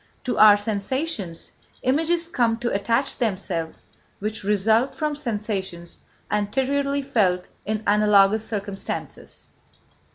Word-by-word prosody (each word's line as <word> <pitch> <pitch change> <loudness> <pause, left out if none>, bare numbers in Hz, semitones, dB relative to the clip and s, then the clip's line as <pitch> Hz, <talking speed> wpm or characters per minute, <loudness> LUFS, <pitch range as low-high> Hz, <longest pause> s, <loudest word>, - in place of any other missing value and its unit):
To 250 - -1
our 210 -1 +9
sensations, 205 - -3 0.3
images 325 +6 +1
come 235 -8 +1
to 240 +1 -2
attach 230 +7 0
themselves 185 -7 -2 0.3
which 210 +1 -4
result 220 +5 +2
from 305 -1 -1
sensations 205 - -4 0.3
anteriorly 275 +7 0
felt 195 -9 +1 0.2
in 215 0 -2
analogous 210 0 +4
circumstances. 200 -3 -5
215 Hz, 100 wpm, -24 LUFS, 200-260 Hz, 0.3 s, our